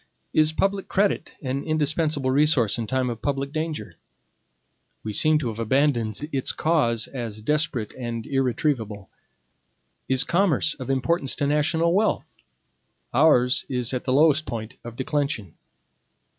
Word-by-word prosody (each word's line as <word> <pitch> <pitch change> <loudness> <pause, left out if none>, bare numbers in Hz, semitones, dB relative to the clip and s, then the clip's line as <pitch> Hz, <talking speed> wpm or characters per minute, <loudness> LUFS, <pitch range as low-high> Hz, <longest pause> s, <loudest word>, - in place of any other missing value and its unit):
Is 155 0 +4
public 195 +4 -1
credit 200 -4 0
an 135 +1 -2
indispensable 155 -3 0
resource 130 -6 +2
in 115 - -3
time 130 +1 0
of 115 - -7
public 140 -1 -2
danger? 155 0 -4 1.1
We 110 - -4
seem 155 +9 +3
to 135 -6 -2
have 110 0 -7
abandoned 120 0 0
its 135 -2 0
cause 120 -9 +1
as 115 -5 -6
desperate 150 -5 0
and 120 -3 -5
irretrievable. 125 -6 -1 1.0
Is 130 +1 +4
commerce 170 -4 +2
of 130 -2 -8
importance 135 +2 0
to 145 - -1
national 160 +3 +1
wealth? 210 +3 0 0.8
Ours 125 -2 +5
is 125 -2 -1
at 125 - -3
the 130 - +1
lowest 155 +1 +4
point 110 -2 -5
of 120 -1 -8
declension. 130 - -2
135 Hz, 135 wpm, -24 LUFS, 120-155 Hz, 1.1 s, Ours